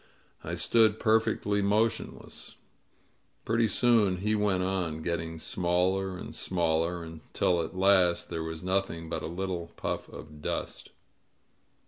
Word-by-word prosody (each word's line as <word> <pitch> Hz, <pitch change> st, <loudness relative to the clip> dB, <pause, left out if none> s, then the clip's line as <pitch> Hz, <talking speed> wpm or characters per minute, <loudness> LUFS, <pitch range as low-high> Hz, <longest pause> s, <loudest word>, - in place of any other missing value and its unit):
I -, -, -4 dB
stood 110 Hz, -2 st, +3 dB
perfectly 110 Hz, -2 st, +2 dB
motionless. 105 Hz, +3 st, -1 dB, 0.9 s
Pretty 115 Hz, +1 st, +2 dB
soon 110 Hz, -5 st, +3 dB
he 105 Hz, +4 st, 0 dB
went 105 Hz, -3 st, +1 dB
on, 90 Hz, -4 st, -2 dB
getting 80 Hz, -1 st, -3 dB
smaller 90 Hz, +3 st, 0 dB
and -, -, -8 dB
smaller, 85 Hz, -1 st, 0 dB
until 80 Hz, +2 st, -1 dB
at 85 Hz, +3 st, -6 dB
last 95 Hz, -3 st, +3 dB
there 85 Hz, -1 st, -2 dB
was 80 Hz, 0 st, -6 dB
nothing 90 Hz, -3 st, -1 dB
but 80 Hz, -1 st, -3 dB
a -, -, -4 dB
little 90 Hz, 0 st, -3 dB
puff -, -, -4 dB
of 75 Hz, -1 st, -11 dB
dust. -, -, -4 dB
90 Hz, 125 wpm, -29 LUFS, 85-100 Hz, 0.9 s, stood